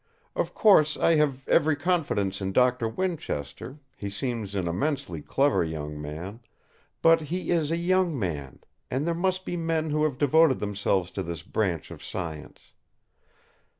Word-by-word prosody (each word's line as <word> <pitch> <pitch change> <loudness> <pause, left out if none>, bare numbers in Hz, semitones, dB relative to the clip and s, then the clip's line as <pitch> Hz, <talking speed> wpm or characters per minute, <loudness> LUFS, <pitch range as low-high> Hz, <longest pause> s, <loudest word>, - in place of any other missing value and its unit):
Of - - -2
course 155 -8 +5
I 165 - +4
have 140 -3 0
every 155 -2 +4
confidence 145 - 0
in 95 0 -2
Doctor 125 -1 +3
Winchester; 130 - -4 0.2
he 100 - -5
seems 110 -2 -3
an 95 -3 -1
immensely 130 - -2
clever 140 - +2
young 75 -2 -5
man. 85 +9 -6 0.6
But 165 0 +6
he 175 +5 -3
is 160 -4 +2
a 165 - 0
young 175 -2 +1
man; 75 - -4 0.3
and 135 +4 -1
there 170 - +1
must 185 +2 -1
be - - -3
men 165 -2 -1
who 150 +1 +1
have 145 -4 -1
devoted 150 0 +4
themselves 100 -3 -1
to 95 - -3
this 85 -2 -5
branch 90 -8 -2
of - - -10
science. 80 -5 -7
130 Hz, 155 wpm, -27 LUFS, -, 0.6 s, But